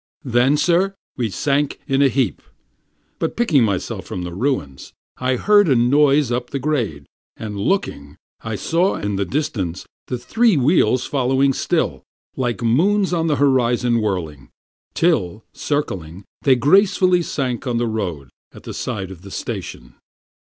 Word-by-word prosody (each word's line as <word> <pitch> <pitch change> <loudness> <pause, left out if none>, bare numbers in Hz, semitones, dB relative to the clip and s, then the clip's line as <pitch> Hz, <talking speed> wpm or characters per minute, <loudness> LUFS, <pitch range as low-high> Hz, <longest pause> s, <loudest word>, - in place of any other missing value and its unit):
Then, 125 +3 +3
sir, 180 +5 +2 0.2
we 120 -4 -1
sank 140 +8 -1
in 135 +1 +1
a 140 - +6
heap; 130 -4 0 0.8
but, - - -2
picking 165 - +3
myself 100 -5 -2
from 90 - -6
the 90 -1 -6
ruins, 90 - -3 0.2
I 130 0 0
heard 205 - +4
a 135 - +4
noise 140 +2 +3
up 125 0 -2
the 140 - -3
grade; 120 - -2 0.3
and 105 -2 -6
looking, 100 - -2 0.3
I 115 -1 -3
saw 170 - +1
in 105 0 -3
the 100 - 0
distance 95 - -3 0.2
The 125 - -3
three 220 - +2
wheels 130 -3 +3
following 135 0 +1
still, - - -1 0.3
like 120 -5 -2
moons 185 - +2
on 165 -1 0
the 150 - +2
horizon 125 -4 +2
whirling, 85 -9 -3 0.5
Till, 110 - +1
circling, 95 - -3 0.2
they 135 -2 +4
gracefully 185 - +3
sank 130 -5 -3
on 120 -1 0
the 120 - 0
road 90 - -4 0.2
at - - -14
the - - -7
side 95 -2 -4
of 90 -3 -11
the 100 - -11
station. - - -6
125 Hz, 150 wpm, -20 LUFS, 100-150 Hz, 0.8 s, a